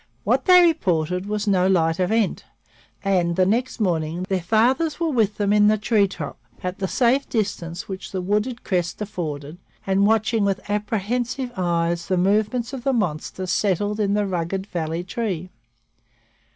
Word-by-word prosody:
What -, -, +1 dB
they 360 Hz, -1 st, +8 dB
reported 180 Hz, -, 0 dB
was 210 Hz, 0 st, -2 dB
no 185 Hz, -2 st, +3 dB
light 165 Hz, -3 st, +2 dB
event 210 Hz, +3 st, +1 dB, 0.6 s
and, 180 Hz, -4 st, +1 dB
the 185 Hz, -, +3 dB
next 240 Hz, +6 st, 0 dB
morning, 170 Hz, -3 st, -1 dB
their 190 Hz, -2 st, 0 dB
fathers 250 Hz, -, +2 dB
were 330 Hz, -2 st, 0 dB
with 215 Hz, -5 st, +1 dB
them 205 Hz, -1 st, +1 dB
in 210 Hz, 0 st, +5 dB
the 215 Hz, 0 st, +4 dB
treetop 200 Hz, -8 st, 0 dB, 0.2 s
at 180 Hz, 0 st, -4 dB
the 190 Hz, -, -1 dB
safe 255 Hz, +5 st, +2 dB
distance 185 Hz, -6 st, -3 dB
which 190 Hz, -1 st, -7 dB
the 190 Hz, -, -2 dB
wooded 210 Hz, +6 st, -1 dB
crest 175 Hz, -3 st, -1 dB
afforded 160 Hz, -6 st, -5 dB, 0.3 s
and 195 Hz, +1 st, +3 dB
watching 220 Hz, 0 st, +2 dB
with 195 Hz, -1 st, -1 dB
apprehensive 230 Hz, +5 st, -2 dB
eyes 170 Hz, -2 st, 0 dB
the 185 Hz, -, +1 dB
movements 215 Hz, +7 st, +1 dB
of 260 Hz, -3 st, -6 dB
the 270 Hz, 0 st, +1 dB
monster 185 Hz, -3 st, -2 dB
settled 205 Hz, +3 st, 0 dB
in 205 Hz, -1 st, +1 dB
the 210 Hz, 0 st, +1 dB
rugged 190 Hz, +1 st, -2 dB
valley 165 Hz, -2 st, -3 dB
tree. 185 Hz, -3 st, -4 dB
195 Hz, 160 wpm, -23 LUFS, 180-220 Hz, 0.6 s, they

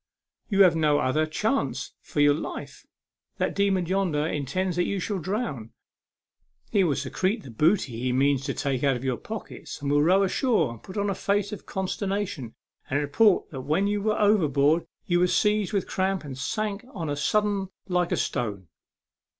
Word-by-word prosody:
You 200 Hz, -2 st, +6 dB
have 180 Hz, -3 st, +5 dB
no 150 Hz, -2 st, +3 dB
other 155 Hz, +3 st, +1 dB
chance 155 Hz, -, -1 dB
for 145 Hz, -, -2 dB
your 145 Hz, 0 st, +6 dB
life. 150 Hz, -, -6 dB, 0.5 s
That -, -, 0 dB
demon 195 Hz, -3 st, +1 dB
yonder 175 Hz, -5 st, 0 dB
intends 165 Hz, +5 st, -1 dB
that 175 Hz, -, +2 dB
you 200 Hz, -, -1 dB
shall 195 Hz, +2 st, -2 dB
drown. 170 Hz, -, -3 dB, 1.0 s
He 200 Hz, -, +4 dB
will 155 Hz, -6 st, +2 dB
secrete 185 Hz, -, -1 dB
the 130 Hz, -, -10 dB
booty 145 Hz, -, +1 dB
he 125 Hz, +1 st, 0 dB
means 135 Hz, +1 st, +2 dB
to 135 Hz, -, -2 dB
take 135 Hz, -2 st, -1 dB
out 140 Hz, -2 st, +3 dB
of 125 Hz, -, -6 dB
your 130 Hz, -2 st, 0 dB
pockets, 220 Hz, -1 st, -8 dB
and 140 Hz, -1 st, -2 dB
will 145 Hz, 0 st, +4 dB
row 185 Hz, +6 st, +4 dB
ashore 195 Hz, -, +1 dB
and 115 Hz, -, -11 dB
put 185 Hz, -, -9 dB
on 205 Hz, 0 st, +1 dB
a -, -, 0 dB
face 200 Hz, +1 st, 0 dB
of 210 Hz, -, -8 dB
consternation, 190 Hz, -, -3 dB, 0.3 s
and 140 Hz, -, +1 dB
report 180 Hz, +8 st, +3 dB
that 135 Hz, -4 st, -5 dB
when 155 Hz, +9 st, +1 dB
you 205 Hz, 0 st, 0 dB
were 215 Hz, +1 st, 0 dB
overboard 160 Hz, -7 st, +3 dB, 0.2 s
you 175 Hz, -1 st, +2 dB
were 180 Hz, -, +4 dB
seized 210 Hz, +1 st, +2 dB
with 200 Hz, -3 st, 0 dB
cramp, 190 Hz, -1 st, -1 dB
and 140 Hz, -3 st, -7 dB
sank 205 Hz, -, -3 dB
on 165 Hz, -4 st, -3 dB
a 145 Hz, -, -1 dB
sudden 200 Hz, +5 st, 0 dB, 0.2 s
like 180 Hz, -2 st, 0 dB
a -, -, +1 dB
stone." 100 Hz, -7 st, -2 dB
175 Hz, 185 wpm, -26 LUFS, 140-200 Hz, 1.0 s, You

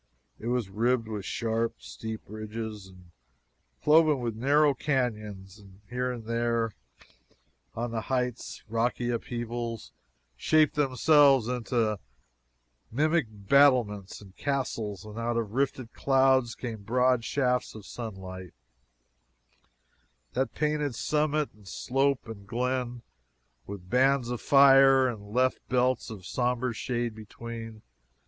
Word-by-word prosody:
It 115 Hz, -, -6 dB
was 120 Hz, -3 st, 0 dB
ribbed 115 Hz, +4 st, 0 dB
with 105 Hz, -3 st, -5 dB
sharp, 115 Hz, 0 st, -1 dB
steep 110 Hz, -, -7 dB
ridges 110 Hz, -1 st, -6 dB
and 90 Hz, -2 st, -17 dB, 0.7 s
cloven 155 Hz, -2 st, +5 dB
with 120 Hz, -3 st, -3 dB
narrow 145 Hz, +5 st, +3 dB
canyons, 105 Hz, -8 st, -3 dB
and 100 Hz, -1 st, -17 dB
here 125 Hz, +1 st, -1 dB
and 120 Hz, -2 st, -6 dB
there 115 Hz, 0 st, 0 dB, 1.0 s
on 120 Hz, +1 st, -3 dB
the 115 Hz, -1 st, -2 dB
heights, 125 Hz, 0 st, -3 dB
rocky 120 Hz, +2 st, 0 dB
upheavals 120 Hz, -1 st, -4 dB, 0.4 s
shaped 155 Hz, -, +3 dB
themselves 140 Hz, -2 st, +4 dB
into 115 Hz, -4 st, 0 dB, 0.9 s
mimic 155 Hz, +2 st, +2 dB
battlements 105 Hz, -2 st, +2 dB
and 95 Hz, -2 st, -15 dB
castles; 115 Hz, -8 st, -3 dB
and 105 Hz, +1 st, -8 dB
out 115 Hz, 0 st, -1 dB
of 110 Hz, -3 st, -2 dB
rifted 130 Hz, -2 st, -1 dB
clouds 130 Hz, -3 st, +3 dB
came 115 Hz, -4 st, -6 dB
broad 125 Hz, +3 st, +2 dB
shafts 125 Hz, -2 st, 0 dB
of 105 Hz, -2 st, -10 dB
sunlight, 95 Hz, -5 st, -8 dB, 1.8 s
that 130 Hz, -2 st, -1 dB
painted 150 Hz, -3 st, 0 dB
summit, 150 Hz, +3 st, 0 dB
and 105 Hz, -2 st, -19 dB
slope 135 Hz, +6 st, 0 dB
and 100 Hz, -3 st, -9 dB
glen, 125 Hz, +1 st, -2 dB, 0.6 s
with 95 Hz, -3 st, -8 dB
bands 130 Hz, +3 st, +3 dB
of 120 Hz, -, -4 dB
fire, 135 Hz, -1 st, +6 dB
and 105 Hz, -4 st, -6 dB
left 130 Hz, +3 st, +2 dB
belts 125 Hz, -1 st, +1 dB
of 100 Hz, -5 st, -9 dB
somber 125 Hz, +2 st, -1 dB
shade 120 Hz, 0 st, -2 dB
between. 115 Hz, +1 st, -9 dB
120 Hz, 120 wpm, -28 LUFS, 110-130 Hz, 1.8 s, fire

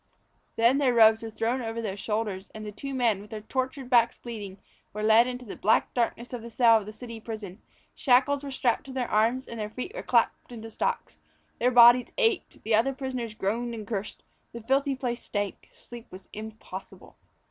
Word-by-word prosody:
Then 235 Hz, +4 st, +4 dB
their 255 Hz, -4 st, +2 dB
robes 220 Hz, -1 st, +6 dB
were 225 Hz, -, -6 dB
thrown 230 Hz, +4 st, -1 dB
over 225 Hz, 0 st, -4 dB
their 210 Hz, -4 st, -3 dB
shoulders, 210 Hz, -2 st, -3 dB
and 215 Hz, 0 st, -7 dB
the 210 Hz, -, -5 dB
two 270 Hz, +6 st, -6 dB
men, 230 Hz, -6 st, +1 dB
with 210 Hz, -, -13 dB
their 215 Hz, -1 st, -6 dB
tortured 260 Hz, +3 st, -3 dB
backs 240 Hz, -2 st, +3 dB
bleeding, 210 Hz, -5 st, -8 dB, 0.4 s
were 210 Hz, +1 st, -4 dB
led 220 Hz, +2 st, +6 dB
into 250 Hz, 0 st, -5 dB
the 205 Hz, -, -7 dB
black 215 Hz, +3 st, +2 dB
darkness 235 Hz, 0 st, -2 dB
of 245 Hz, -, -4 dB
the 235 Hz, -, -9 dB
cell 230 Hz, 0 st, +5 dB
of 210 Hz, -2 st, -5 dB
the -, -, -6 dB
city 230 Hz, +1 st, -9 dB
prison; 215 Hz, -3 st, -8 dB, 0.3 s
shackles 275 Hz, +2 st, +3 dB
were 280 Hz, -, -5 dB
snapped 255 Hz, -3 st, +1 dB
on -, -, -26 dB
to 270 Hz, -, -9 dB
their 255 Hz, -2 st, -3 dB
arms, 230 Hz, +5 st, +2 dB
and 230 Hz, -, -7 dB
their 210 Hz, -1 st, -3 dB
feet 255 Hz, -, -6 dB
were -, -, -5 dB
clapped -, -, +1 dB
into 225 Hz, -1 st, -8 dB
stocks. -, -, -3 dB, 0.4 s
Their 245 Hz, -, +3 dB
bodies 240 Hz, 0 st, +7 dB
ached; 455 Hz, -5 st, 0 dB
the 220 Hz, -, -1 dB
other 230 Hz, +5 st, +3 dB
prisoners 255 Hz, -5 st, -4 dB
groaned 230 Hz, +4 st, -2 dB
and 215 Hz, -2 st, -7 dB
cursed; 205 Hz, -1 st, -5 dB, 0.3 s
the 235 Hz, -, -7 dB
filthy 270 Hz, +3 st, +1 dB
place 245 Hz, -2 st, -3 dB
stank; 205 Hz, -2 st, -4 dB
sleep 240 Hz, -1 st, -12 dB
was 185 Hz, +1 st, -12 dB
impossible. 215 Hz, -3 st, -9 dB
230 Hz, 205 wpm, -27 LUFS, 215-250 Hz, 0.4 s, bodies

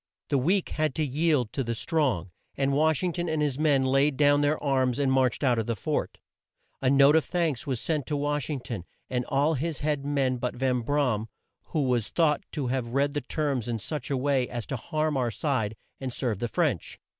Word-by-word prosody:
The 140 Hz, -, +2 dB
weak 180 Hz, +8 st, +1 dB
had 155 Hz, -3 st, -1 dB
to 155 Hz, -, +1 dB
yield 145 Hz, -4 st, +1 dB
to 135 Hz, -, -1 dB
the 115 Hz, -1 st, -2 dB
strong, 120 Hz, -, 0 dB, 0.3 s
and 140 Hz, 0 st, +1 dB
Wash 155 Hz, +3 st, +2 dB
ing 180 Hz, -2 st, 0 dB
ton 175 Hz, 0 st, -2 dB
and 160 Hz, -1 st, 0 dB
his 145 Hz, -2 st, 0 dB
men 145 Hz, -4 st, +3 dB
laid 135 Hz, +1 st, +2 dB
down 145 Hz, 0 st, +4 dB
their 145 Hz, +1 st, +2 dB
arms 130 Hz, -3 st, +1 dB
and 140 Hz, -2 st, +1 dB
marched 130 Hz, 0 st, +2 dB
out 125 Hz, -4 st, +3 dB
of 110 Hz, -, -2 dB
the 115 Hz, -, 0 dB
fort. -, -, -2 dB, 0.6 s
A 130 Hz, -, +2 dB
note 140 Hz, +2 st, +6 dB
of 160 Hz, -, +4 dB
thanks 165 Hz, -7 st, -1 dB
was 130 Hz, -4 st, -1 dB
sent 150 Hz, -2 st, -1 dB
to 150 Hz, -, -1 dB
Wash 145 Hz, -2 st, -1 dB
ing 145 Hz, -4 st, -2 dB
ton, 115 Hz, -7 st, -5 dB, 0.3 s
and 125 Hz, -1 st, 0 dB
all 145 Hz, +3 st, +2 dB
his 155 Hz, +1 st, -2 dB
head 145 Hz, -1 st, 0 dB
men 140 Hz, -3 st, 0 dB
but 125 Hz, 0 st, -3 dB
Van 130 Hz, 0 st, +1 dB
Bra 140 Hz, 0 st, +1 dB
am, 110 Hz, +1 st, -4 dB, 0.4 s
who 155 Hz, -, -1 dB
was 125 Hz, -4 st, +1 dB
thought 155 Hz, -4 st, +2 dB
to 145 Hz, -, -3 dB
have 125 Hz, -1 st, -1 dB
read 140 Hz, +1 st, +2 dB
the 145 Hz, -, -1 dB
terms 140 Hz, -8 st, -2 dB
in 120 Hz, -1 st, -1 dB
such 150 Hz, +7 st, -4 dB
a 140 Hz, -, 0 dB
way 135 Hz, -1 st, +1 dB
as 120 Hz, -2 st, -4 dB
to 135 Hz, -, -3 dB
harm 155 Hz, +4 st, -1 dB
our 125 Hz, -2 st, +1 dB
side 110 Hz, -4 st, -1 dB, 0.2 s
and 130 Hz, -1 st, -4 dB
serve 120 Hz, -5 st, -2 dB
the 120 Hz, -, -1 dB
French. 115 Hz, -, -1 dB
140 Hz, 225 wpm, -27 LUFS, 125-150 Hz, 0.6 s, note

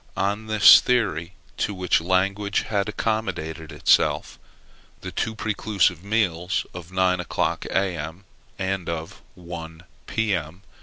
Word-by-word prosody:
On 100 Hz, +3 st, -1 dB
this 110 Hz, -2 st, +8 dB
theory, 95 Hz, -8 st, 0 dB, 0.2 s
to 100 Hz, -, -1 dB
which 90 Hz, -4 st, +1 dB
language 100 Hz, +3 st, +1 dB
had 100 Hz, -1 st, -1 dB
accommodated 85 Hz, -9 st, -3 dB
itself, -, -, +2 dB, 0.6 s
the -, -, -6 dB
two 110 Hz, -, -2 dB
prelusive 100 Hz, -5 st, 0 dB
meals 95 Hz, -5 st, 0 dB
of 90 Hz, 0 st, -9 dB
nine 95 Hz, -1 st, +2 dB
o'clock, 90 Hz, -, -1 dB
A.M., 90 Hz, -2 st, -2 dB, 0.3 s
and 95 Hz, -2 st, -2 dB
of 80 Hz, -1 st, -5 dB
one, 85 Hz, -2 st, -9 dB, 0.2 s
P.M. 95 Hz, -5 st, -2 dB
95 Hz, 115 wpm, -24 LUFS, 85-100 Hz, 0.6 s, this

